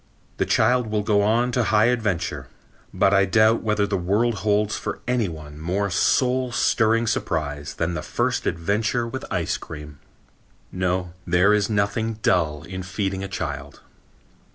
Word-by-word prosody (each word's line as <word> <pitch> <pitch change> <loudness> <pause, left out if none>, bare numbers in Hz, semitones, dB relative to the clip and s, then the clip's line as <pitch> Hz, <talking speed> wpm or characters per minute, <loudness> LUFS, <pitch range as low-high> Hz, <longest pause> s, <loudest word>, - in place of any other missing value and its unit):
The - - 0
child 125 -1 +3
will 105 -1 -1
go 105 -1 +2
on 115 +4 +2
to 125 -2 +1
high 105 0 +4
adventure, 95 - -1 0.4
but 95 - +2
I 100 0 +5
doubt 110 +3 +3
whether 105 -2 +1
the 100 -1 -1
world 105 +7 +1
holds 105 0 +1
for - - -4
any 125 -5 +1
one 75 -2 -10
more 95 +5 -1
soul 125 +6 +2
stirring 115 0 +2
surprise 75 -9 -2
than 85 +1 -1
the - - -3
first - - -1
adventure 105 +7 0
with 130 +3 -6
ice - - -1
cream. 75 -2 -10 0.7
No, 90 -1 -1
there 90 +4 +4
is 105 0 +1
nothing 110 +2 0
dull 75 -5 +1
in 95 -1 -6
feeding 95 +1 -3
a - - -3
child. 70 -6 -5
100 Hz, 155 wpm, -23 LUFS, 85-110 Hz, 0.7 s, I